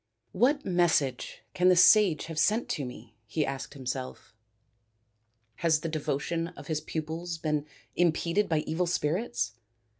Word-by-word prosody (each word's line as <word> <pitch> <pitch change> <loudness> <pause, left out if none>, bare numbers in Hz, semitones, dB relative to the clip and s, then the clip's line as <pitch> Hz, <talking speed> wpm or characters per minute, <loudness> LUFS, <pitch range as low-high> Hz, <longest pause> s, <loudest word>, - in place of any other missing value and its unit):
" 115 - -48
What 285 +2 +1
message 165 -8 0
can 180 +1 +4
the 185 - +6
sage 180 -2 +6
have 160 -1 -4
sent 215 +8 +2
to 140 - -2
me? 125 -2 -10
" - - -44
he 150 +7 0
asked 135 +1 -5
himself. 130 -4 -6 0.6
" 110 +1 -45 0.5
Has 160 -2 +2
the 165 - -3
devotion 155 +2 -2
of - - -9
his 155 -2 -2
pupils 160 +2 -4
been 150 -2 -2 0.3
impeded 175 +3 +1
by 160 -2 +2
evil 165 +3 -1
spirits 150 - -1
160 Hz, 155 wpm, -28 LUFS, 140-175 Hz, 0.6 s, the